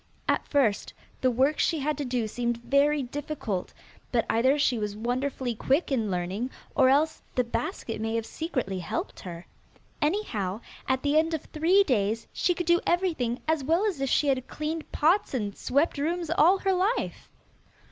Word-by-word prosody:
At - - +1
first 255 -9 +1 0.3
the 255 - +4
work 265 +5 +2
she 330 - +2
had 300 +1 -1
to 290 - -2
do 245 -3 -1
seemed 240 +1 -2
very 285 +2 +3
difficult, 260 -7 -4 0.4
but 230 -3 +2
either 260 +5 +3
she 260 -5 +2
was 210 -1 -3
wonderfully 250 +2 -2
quick 275 +8 0
in 225 -6 +1
learning, 185 +7 -2 0.2
or 260 - +5
else 300 +4 +2
the 250 - +3
basket 230 -1 -4
may 225 +1 -1
have 225 -1 -1
secretly 255 - -3
helped 175 - -4
her. 175 -1 -8 0.6
Anyhow 230 - -1 0.3
at 260 0 0
the 290 +1 +4
end 325 +1 +1
of 310 - -5
three 350 +6 +3
days 225 - 0
she 355 - +1
could 350 - -3
do 345 +1 +4
everything 320 -10 0
as 315 -3 +1
well 330 +9 +2
as 370 -10 -1
if 270 - 0
she 295 - +3
had 260 -2 +1
cleaned 310 +1 -4
pots 330 0 +2
and 205 -5 -2
swept 285 +3 +1
rooms 335 +2 -1
all 345 +3 +5
her 385 0 +1
life. 390 +7 -1
270 Hz, 180 wpm, -27 LUFS, 230-320 Hz, 0.6 s, or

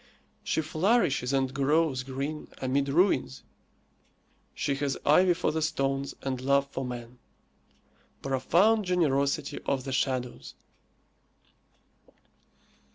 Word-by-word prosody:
She 160 - 0
flourishes 155 - +1
and 135 -1 0
grows 140 0 +1
green 135 +4 -5
amid 135 +2 0
ruins; 135 - +1 1.1
she 140 - -1
has 140 -1 -1
ivy 175 +4 +5
for - - 0
the 160 - -2
stones 135 -3 -1
and 130 -2 -3
love 140 +1 +2
for 135 - -4
man. 125 -1 -7 1.0
Profound 175 - +2
generosity 140 -6 0
of 135 -2 0
the 135 - -5
shadows! 130 -2 -2
140 Hz, 100 wpm, -28 LUFS, 130-155 Hz, 1.1 s, ivy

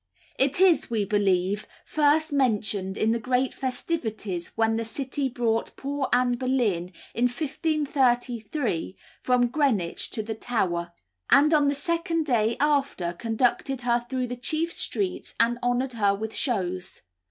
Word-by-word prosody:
It 270 +4 +2
is, 370 -3 +4
we 220 -3 0
believe, 195 0 +1 0.2
first 305 +1 +2
mentioned 210 -7 0
in 220 - +2
the 230 - +1
great 250 +3 0
festivities 220 - -3
when 225 0 +2
the 230 - -1
City 265 +4 -3
brought 230 -2 -1
poor 280 0 -2
Anne 245 0 +3
Boleyn, 230 -9 0 0.2
in 240 - +1
1533, 250 - 0 0.2
from 250 -1 +3
Greenwich 235 - 0
to 220 - -2
the 220 +1 -4
Tower, 180 -7 -1 0.4
and 300 +3 +6
on 295 -2 +4
the 285 - +2
second 330 +2 -1
day 230 -4 +1
after 280 -12 +1
conducted 240 +5 0
her 240 0 +1
through 255 -1 -1
the 245 0 -4
chief 315 +7 -2
streets 390 -3 -3
and 235 +1 +2
honoured 245 +1 0
her 205 -3 +2
with 220 +2 -5
shows. 185 -8 -2
245 Hz, 140 wpm, -26 LUFS, 215-280 Hz, 0.4 s, and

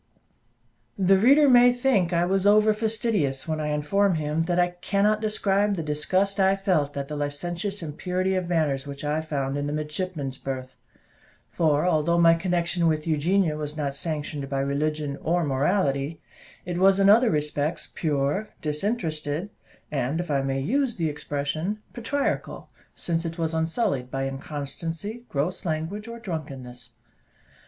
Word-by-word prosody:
The 195 0 +4
reader 280 +7 +6
may 245 -1 +7
think 245 -8 +1
I 170 0 +2
was 195 +2 +1
over 215 +1 +5
fastidious 215 - -1
when 155 -1 -1
I 150 - -2
inform 160 +6 +1
him 155 0 -1
that 175 0 0
I 180 0 +3
cannot 200 +4 +1
describe 205 -1 +1
the 165 - -3
disgust 185 +7 0
I 190 0 +4
felt 175 -8 0
at 140 -1 -3
the 150 - -5
licentious 170 +7 -3
impurity 180 +5 -1
of 185 -2 -1
manners 150 -5 0
which 140 0 -7
I 150 +2 0
found 140 -3 -2
in 145 0 -2
the 145 - -2
midshipmen's 150 -3 -4
berth; 130 -1 -5 0.7
for 155 -1 +2
although 170 -1 +2
my 165 -1 +6
connection 175 0 0
with 155 -1 0
Eugenia 165 +2 +2
was 150 0 -5
not 140 -2 -2
sanctioned 150 -2 -4
by 135 -1 -1
religion 145 +1 -1
or 175 +2 +1
morality, 140 +1 0 0.5
it 175 -1 -3
was 195 +1 +5
in 195 - +5
other 225 +4 +6
respects 150 +1 -1
pure, 150 +6 -1
disinterested, 155 0 -2 0.4
and, 140 +2 -1
if 175 -3 -3
I 140 -1 +2
may 135 0 -1
use 255 - 0
the 165 -3 0
expression, 150 +6 -3 0.2
patriarchal, 270 +4 -2 0.2
since 165 -1 -1
it 165 -1 -5
was 165 -1 0
unsullied 160 - 0
by 135 +1 -2
inconstancy, 165 - -5
gross 155 +6 -2
language, 170 +6 -3
or 230 0 -7
drunkenness. 140 - -6
165 Hz, 155 wpm, -25 LUFS, 145-195 Hz, 0.7 s, may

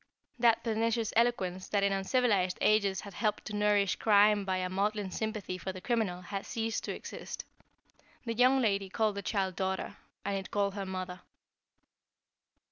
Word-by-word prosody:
That 230 -1 +4
pernicious 230 0 0
eloquence 190 -6 +1
that 200 -1 +1
in 200 - +3
uncivilized 195 -2 +1
ages 205 -3 +3
had 200 - -10
helped 215 +2 -1
to 210 - -5
nourish 205 -2 +2
crime 205 -1 +4
by 190 -1 0
a 185 0 -1
maudlin 200 +1 -1
sympathy 215 -4 -3
for 190 - -4
the 185 - -8
criminal, 205 -5 -1
had 195 +2 -5
ceased 225 -1 -2
to - - -3
exist. - - -7 0.8
The 230 - -1
young 255 +3 +4
lady 200 -5 +1
called 215 +1 +1
the 200 - -4
child 195 -3 -1
daughter, 190 0 -2 0.3
and 200 0 0
it 195 -1 -4
called 200 -1 0
her 195 -1 -4
mother." 185 -1 -5
200 Hz, 165 wpm, -31 LUFS, 190-220 Hz, 0.8 s, That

